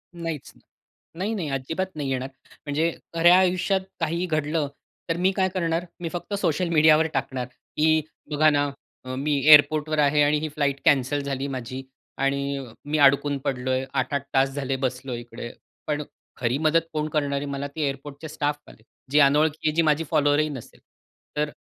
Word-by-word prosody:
नाहीच 165 -4 -5
नाही. - - -24 0.5
नाही, 195 +6 -2
नाही 165 -8 -3
अजिबात 160 +8 -3
नाही 145 -3 -3
येणार. 130 +1 -2 0.4
म्हणजे 155 +3 +1 0.2
खऱ्या 175 +2 +6
आयुष्यात 185 +1 +2 0.2
काहीही 170 +2 -1
घडलं 155 -2 0 0.4
तर 165 - 0
मी 185 +2 +3
काय 190 -1 +2
करणार, 170 -2 -1
मी 170 - -3
फक्त 175 +4 -6
सोशल 170 0 +1
मीडियावर 155 0 +5
टाकणार 130 -2 -2 0.3
की, 155 +1 +4 0.3
"बघा 155 +1 +4
ना 145 -1 +1 0.4
अ, 130 - -4
मी 145 +3 -1 0.2
एअरपोर्टवर 155 +1 +6
आहे 150 +1 +4
आणि 150 +1 +3
ही 155 - -3
फ्लाइट 145 -2 -1
कॅन्सल 145 +1 +3
झाली 140 -1 -3
माझी 130 +1 -5 0.4
आणि 140 0 0 0.3
मी 150 +1 -1
अडकून 140 +1 +3
पडलोय 130 0 -1
8-8 140 +1 -1
तास 135 0 +3
झाले 135 -1 -1
बसलोय 125 -1 -3
इकडे." 120 0 -8 0.4
पण 150 0 -1 0.3
खरी 125 +1 0
मदत 160 +2 +3
कोण 150 0 -1
करणार 145 -2 0
आहे 140 - -3
मला, 140 0 -3
ते 155 +2 -7
एअरपोर्टचे 140 +3 -6
स्टाफवाले. 145 -6 -4 0.3
जे 150 - +5
अनोळखी 150 +2 +3
आहे, 155 - 0
जी 165 - +4
माझी 155 0 +2
फॉलोअर्स 145 0 +3
ही 155 - -2
नसेल. 130 -5 -9 0.6
तर 150 0 +1
150 Hz, 170 wpm, -25 LUFS, 140-160 Hz, 0.6 s, खऱ्या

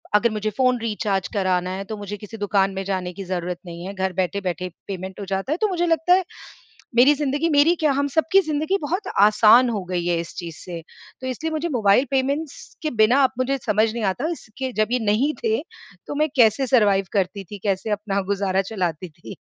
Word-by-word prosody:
अगर 235 +3 +4
मुझे 215 0 -2
phone 255 -1 +3
recharge 210 -4 -1
कराना 185 -3 0
है, 195 - -4
तो 220 - -5
मुझे 205 0 -6
किसी 210 +2 -10
दुकान 195 -1 +1
में 190 0 -3
जाने 185 -2 -2
की 195 - -7
ज़रूरत 180 -1 -3
नहीं 170 +1 -8
है, 195 - -6
घर 190 -1 -2
बैठे 185 +2 -1
बैठे 180 -1 -3 0.2
पेमेंट 190 0 -6
हो 200 - -5
जाता 195 +7 -2
है। - - -2
तो 430 - +3
मुझे 350 -2 0
लगता 330 +2 +3
है, 375 - +4 0.7
मेरी 260 +5 +7
ज़िंदगी 295 +3 0
मेरी 295 +3 +4
क्या, 310 -3 +1
हम 280 +1 0
सबकी 355 +5 +4
ज़िंदगी 315 +4 -1
बहुत 360 +7 -2
आसान 215 +4 +6
हो 205 -5 -2
गई 175 -1 -1
है, 170 -1 +1
इस 170 - -10
चीज़ 170 -3 -6
से। 170 -2 -7 0.4
तो 260 - -4
इसलिए 315 +6 -3
मुझे 315 +2 -2
मोबाइल 235 0 +3
पेमेंट्स 275 +3 -2
के 310 - -1
बिना 255 +6 +4
अब - - 0
मुझे 265 +2 +1
समझ 215 0 +2
नहीं 235 -1 -3
आता, 285 +10 -3
इसके 260 -4 -6
जब 215 - +2
ये 250 - +2
नहीं 245 +9 +2
थे, 445 -1 +1 0.5
तो - - -4
मैं 305 +2 +1
कैसे 235 +2 +4
सर्वाइव 205 -6 +3
करती 195 0 -1
थी, 200 +2 -10
कैसे 200 +1 -1
अपना 205 -1 -1
गुज़ारा 195 -1 +1
चलाती 180 -3 -2
थी?, 165 +5 -11
215 Hz, 215 wpm, -22 LUFS, 190-280 Hz, 0.7 s, मेरी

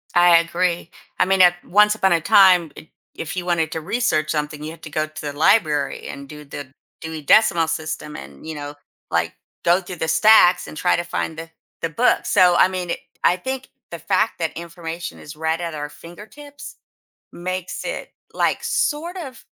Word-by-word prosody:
I 175 -1 +7
agree. 170 0 -1 0.3
I - - +4
mean, 190 0 +3
at 175 -1 +6
once 210 +2 +4
upon 190 -4 +2
a 165 - +1
time, 185 -4 +5
it 160 - -12 0.3
if 165 +2 -6
you 180 -1 -4
wanted 165 -3 0
to 160 - -4
research 155 -5 0
something, 150 -1 -3
you 155 - -5
had 165 - -13
to 155 - -8
go 155 +1 -1
to 155 - -10
the 145 -1 -6
library 155 -5 +2
and 140 0 -9
do 150 -1 -10
the 140 -1 -9 0.3
Dewey 160 -1 -6
Decimal 170 0 +4
System 160 -2 -4
and, 70 - -11
you 160 - -5
know, 145 0 -7 0.4
like, - - 0 0.3
go 175 +2 +4
through 180 -1 -8
the 160 - -2
stacks 175 +2 +5
and 155 - -10
try - - +2
to 175 - -2
find 160 -2 -4
the 165 0 -8 0.3
the 165 - -1
book. 235 +10 +2
So, 180 -1 +4
I - - +6
mean, 180 -2 -4
it - - -3 0.2
I 180 - +4
think 260 +7 -5 0.2
the 170 - -6
fact 215 +7 0
that 160 -2 -2
information 170 0 -7
is 150 +1 -10
right 160 +1 -1
at 170 -2 -4
our 145 0 -5
fingertips 215 - -12 0.6
makes 185 +1 -5
it, - - -5 0.2
like, - - 0
sort 335 +5 -1
of, 270 -9 -8
170 Hz, 195 wpm, -21 LUFS, 155-185 Hz, 0.6 s, I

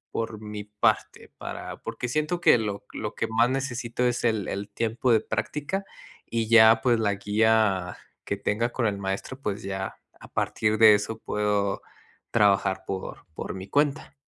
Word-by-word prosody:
por 115 -1 -3
mi 105 -1 -6
parte 105 0 -1
para - - -6
porque 125 - -4
siento 155 +6 -1
que 175 - +6
lo 105 -3 -4
lo - - -5
que - - -1
más 115 +2 +3
necesito 125 -2 -2
es 120 -1 -1
el 110 -4 +1
el 100 +1 -4
tiempo 115 +4 0
de 115 - +5
práctica 145 - -3 0.4
y 115 -1 -2
ya, 110 0 +7
pues 120 -1 +3
la 100 -2 +1
guía 105 -3 +2 0.3
que 100 - -3
tenga 110 +4 0
con 120 -3 0
el 100 - -1
maestro, 95 +6 -4
pues, 105 -3 -3
ya 95 -1 -4 0.2
a - - -12
partir 110 0 0
de 110 -1 +8
eso 105 +2 -3
puedo 105 -2 0 0.5
trabajar 100 -2 +3
por 95 -1 -5
por - - -5
mi 95 0 -7
cuenta. 145 +4 0
110 Hz, 170 wpm, -26 LUFS, 100-120 Hz, 0.5 s, de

